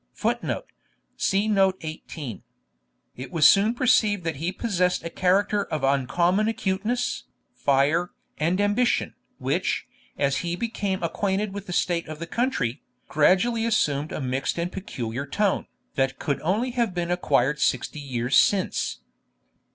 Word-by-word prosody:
[Footnote: - - -1 0.5
See 200 +2 +1
Note 195 -3 +3
18.] 155 - -7 0.8
It 130 +1 -7
was 155 -3 +6
soon 210 +4 +4
perceived 220 -6 +3
that 160 -3 -2
he 165 +5 -2
possessed 180 -5 0
a 170 - -5
character 200 +3 +2
of 155 -3 -4
uncommon 170 - +2
acuteness, 225 +2 -1 0.3
fire, 145 +6 +2 0.3
and 170 +5 +1
ambition, 205 +4 +1 0.2
which, - - -1 0.3
as 140 -1 +1
he 175 0 -2
became 200 -3 -2
acquainted 195 +4 -1
with 200 0 -7
the - - -5
state 175 -1 0
of 155 0 -6
the 170 - -5
country, 165 - -1 0.3
gradually 190 +9 +3
assumed 150 -10 +1
a - - -4
mixed 130 +2 -2
and 170 +1 -2
peculiar 135 - -5
tone, 200 +6 0 0.3
that 135 -1 0
could 140 - -2
only 210 +10 0
have 235 -6 -1
been 175 0 -1
acquired 150 -5 +1
Sixty 150 - 0
Years 125 -2 -1
Since. 185 - +2
180 Hz, 140 wpm, -25 LUFS, 145-205 Hz, 0.8 s, was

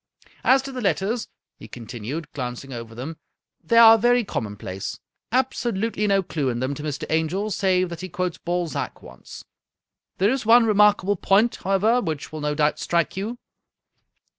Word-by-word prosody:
" - - -29
As 265 0 +2
to 275 - -6
the 255 -1 -5
letters," 215 +3 -1 0.3
he - - -11
continued, 120 +6 -7
glancing 130 0 -6
over 115 -1 -8
them, 145 +7 -6 0.5
"they 230 +8 +2
are 225 -1 +9
very 245 +2 +3
common 105 - -4
place. 95 -1 -6 0.3
Absolutely 230 -4 0
no 195 -1 +2
clew 150 -6 -2
in 120 -1 -2
them 130 +3 -1
to 145 - -7
Mr. 150 -2 -4
Angel, 170 +7 0
save 185 -1 +1
that 170 -1 -7
he 185 - -6
quotes 180 0 -3
Balzac 175 -2 -3
once. 60 - -12 0.7
There 200 +4 +3
is 265 -1 -1
one 230 +2 +6
remarkable 205 -2 +3
point, 205 +6 +2
however, 210 +6 +2
which 155 - -4
will 155 -1 -6
no 150 0 -1
doubt 150 0 +1
strike 170 -2 0
you." 215 +6 -4
185 Hz, 170 wpm, -23 LUFS, 150-220 Hz, 0.7 s, are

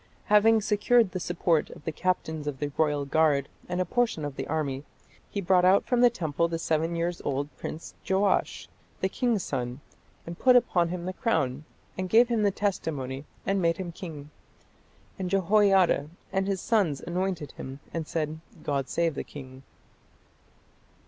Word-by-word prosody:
Having 220 +1 +6
secured 215 +1 +3
the 185 - -3
support 170 -2 +1
of - - -13
the 160 - -1
captains 160 -3 -2
of 145 -2 -3
the 145 +1 -3
royal 150 -2 +1
guard 145 -1 +2 0.2
and 180 0 -1
a 185 - +1
portion 230 -6 0
of 145 -2 -5
the - - -4
army, 145 -3 -2 0.5
he 200 - -3
brought 180 0 +3
out 185 +2 +5
from 245 -2 +2
the 245 - +7
temple 170 -7 -1
the 165 0 -2
seven 165 +1 0
years 170 +1 -2
old 140 +1 -2
prince 160 - -7 0.2
Joash, 190 0 +1 0.3
"the 190 - 0
king's 230 -2 0
son, 125 -1 -3 0.5
and 170 0 -8
put 255 -1 +6
upon 180 -8 +3
him 175 0 -4
the 185 - -3
crown, 155 - -1 0.3
and 185 -1 -2
gave 235 +4 +5
him 230 -2 +1
the 205 - +4
testimony, 150 -9 -3 0.2
and 195 -1 +1
made 165 -1 +2
him 185 -2 -5
king. 155 -4 -9 0.9
And 185 -1 -2
Jehoiada 195 -5 +3 0.2
and 190 0 +1
his 195 -2 -1
sons 190 -12 +1
anointed 175 -4 -2
him, 135 +1 -8
and 165 -2 -3
said, 155 -1 -2 0.2
God 140 -3 -1
save 170 -1 +1
the - - -4
king. 130 -2 -11
170 Hz, 170 wpm, -27 LUFS, 150-195 Hz, 0.9 s, the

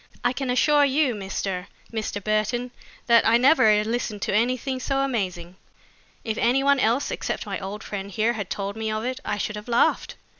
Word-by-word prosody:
I 245 - +2
can 265 0 -4
assure 290 +4 +4
you, 280 -1 +2
Mr. 195 -2 -4 0.3
Mr. 215 -2 -3
Burton, 215 +4 0 0.3
that 235 -1 +5
I 225 +1 +5
never 230 -6 +5
listened 220 -2 -3
to - - -1
anything 255 +4 0
so 270 +1 -1
amazing. 185 -9 -3 0.7
If 220 -1 -3
any 255 +3 +2
one 280 0 +4
else 240 +4 +1
except - - -3
my - - -4
old 200 +2 -6
friend 200 -1 -5
here 220 +4 +1
had 205 -5 -5
told 200 0 -3
me 220 0 -3
of 215 +1 -3
it, 255 +1 -3
I 210 - -2
should 210 +1 -3
have 210 - -9
laughed. 235 0 +1
225 Hz, 190 wpm, -24 LUFS, 210-255 Hz, 0.7 s, that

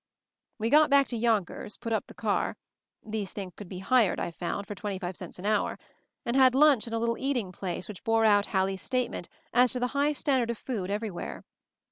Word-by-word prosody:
We 225 +1 -1
got 305 +1 +6
back 280 0 +6
to 240 - -3
Yonkers, 220 -3 0
put 230 -2 -3
up 220 - -1
the - - -13
car - - -1 0.2
— - - -51
these 205 -3 -2
things 190 -3 -6
could 205 -4 -10
be 185 - -6
hired, 210 +2 +3
I - - -2
found, 175 +4 -4
for 205 - -6
twenty 200 -1 -4
five 185 -1 -5
cents 180 -1 -8
an 185 - -8
hour 210 -1 +1 0.2
— - - -49
and 235 - -1
had 260 -1 +6
lunch 280 -5 +5
in 230 - -6
a - - +1
little 230 0 0
eating 250 -8 -1
place 180 0 -4
which 210 -4 -9
bore 225 0 +3
out 205 -1 +4
Hal 190 -1 +2
lie's 190 0 -4
statement 250 -8 -2 0.2
as 250 +1 +5
to 250 - -2
the 250 0 0
high 285 +1 +2
standard 265 -5 +1
of 235 - -2
food 210 -8 -4
everywhere. 205 -2 -4
220 Hz, 230 wpm, -28 LUFS, 195-250 Hz, 0.2 s, got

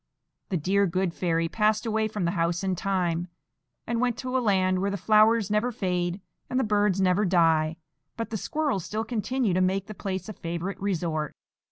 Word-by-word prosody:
The 185 - 0
dear 195 +5 +2
good 180 0 -1
fairy 165 -2 0
passed 215 +4 +1
away 220 -1 +1
from 210 -4 -3
the 170 - +1
house 170 +2 0
in 190 -1 0
time, 175 -2 -1 0.6
and 235 0 -1
went 245 -2 +1
to 255 0 -4
a 260 - +3
land 185 -4 +2
where 200 - +1
the 200 - -2
flowers 215 +1 +4
never 215 +4 +1
fade 180 -5 -1 0.3
and 255 - 0
the - - +2
birds 205 -3 +2
never 185 +1 +3
die; 165 -4 +3 0.4
but 230 -1 -4
the - - -2
squirrels 290 - -1
still 220 +4 -3
continue 235 -2 0
to 185 - +2
make 190 +1 +1
the 215 - -8
place 190 -2 -4
a 215 - -6
favourite 175 +3 -5
resort. 165 -6 -2
195 Hz, 195 wpm, -27 LUFS, 175-215 Hz, 0.6 s, flowers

